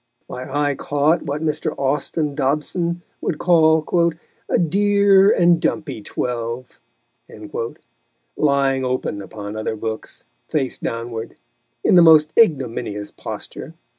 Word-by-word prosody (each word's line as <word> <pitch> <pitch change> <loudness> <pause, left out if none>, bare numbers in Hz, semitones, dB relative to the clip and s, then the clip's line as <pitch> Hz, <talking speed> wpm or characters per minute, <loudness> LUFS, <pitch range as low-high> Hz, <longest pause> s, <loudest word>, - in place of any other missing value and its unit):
My 130 +1 -7
eye 145 0 +1
caught 145 +5 +1
what 145 +2 -3
Mr. 155 0 -2
Austin 145 +2 -1
Dobson 170 +6 -1 0.2
would 155 - -2
call 170 0 +3 0.4
"a - - +3
dear 200 +2 +4
and 170 -1 +4
dumpy 140 -8 -2
twelve," 120 +3 -4 1.6
lying 140 -2 +2
open 125 -5 -2
upon 105 +1 -8
other 110 0 -3
books, 110 0 -6 0.2
face 135 -4 -2
downward, 115 -1 -5 0.5
in - - +3
the 180 - +8
most 155 -2 +6
ignominious 115 - +1
posture. - - -8
145 Hz, 110 wpm, -20 LUFS, 125-165 Hz, 1.6 s, the